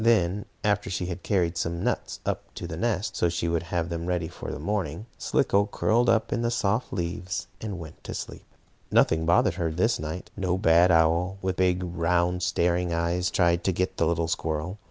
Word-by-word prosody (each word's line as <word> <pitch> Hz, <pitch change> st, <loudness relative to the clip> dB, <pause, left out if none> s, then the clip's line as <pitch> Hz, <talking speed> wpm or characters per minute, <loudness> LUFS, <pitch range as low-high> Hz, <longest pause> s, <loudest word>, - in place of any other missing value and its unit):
Then, 105 Hz, -4 st, +3 dB, 0.2 s
after 105 Hz, -1 st, +1 dB
she 90 Hz, -1 st, -2 dB
had 90 Hz, +1 st, -5 dB
carried 90 Hz, -4 st, +1 dB
up -, -, -8 dB
some 85 Hz, 0 st, -2 dB
nuts -, -, -2 dB, 0.4 s
to -, -, -5 dB
the -, -, -5 dB
nest, -, -, -1 dB
so 85 Hz, -, +2 dB
she 85 Hz, 0 st, -2 dB
would 85 Hz, -1 st, +1 dB
have 85 Hz, 0 st, -2 dB
them 85 Hz, 0 st, -4 dB
ready 90 Hz, -2 st, 0 dB
for 85 Hz, -, -8 dB
morning, 90 Hz, +1 st, -2 dB
Slicko 100 Hz, +1 st, +2 dB
curled 115 Hz, +3 st, +2 dB
up 115 Hz, 0 st, +2 dB
in 115 Hz, -, 0 dB
the 120 Hz, -, +1 dB
soft 110 Hz, 0 st, 0 dB
leaves 90 Hz, 0 st, -3 dB, 0.2 s
and 105 Hz, -4 st, -4 dB
went 80 Hz, -2 st, -10 dB
to -, -, -5 dB
sleep. -, -, -7 dB, 0.4 s
Nothing 80 Hz, 0 st, +3 dB
bothered 85 Hz, -, +4 dB
her 85 Hz, -, +1 dB
this 100 Hz, +9 st, +1 dB
night. 80 Hz, +3 st, -5 dB
No 95 Hz, -2 st, 0 dB
bad 85 Hz, -1 st, +5 dB
old 85 Hz, -, +6 dB
owl, 85 Hz, +4 st, +2 dB
with 95 Hz, -1 st, -1 dB
big, 90 Hz, 0 st, +2 dB
round, 85 Hz, +1 st, +1 dB
staring 85 Hz, 0 st, +1 dB
eyes, 85 Hz, +2 st, 0 dB
tried 85 Hz, -1 st, +2 dB
to 95 Hz, -, +2 dB
get 90 Hz, +1 st, -1 dB
the 85 Hz, -, +2 dB
little 85 Hz, 0 st, +1 dB
squirrel. 80 Hz, +4 st, -2 dB
90 Hz, 200 wpm, -26 LUFS, 85-95 Hz, 0.4 s, old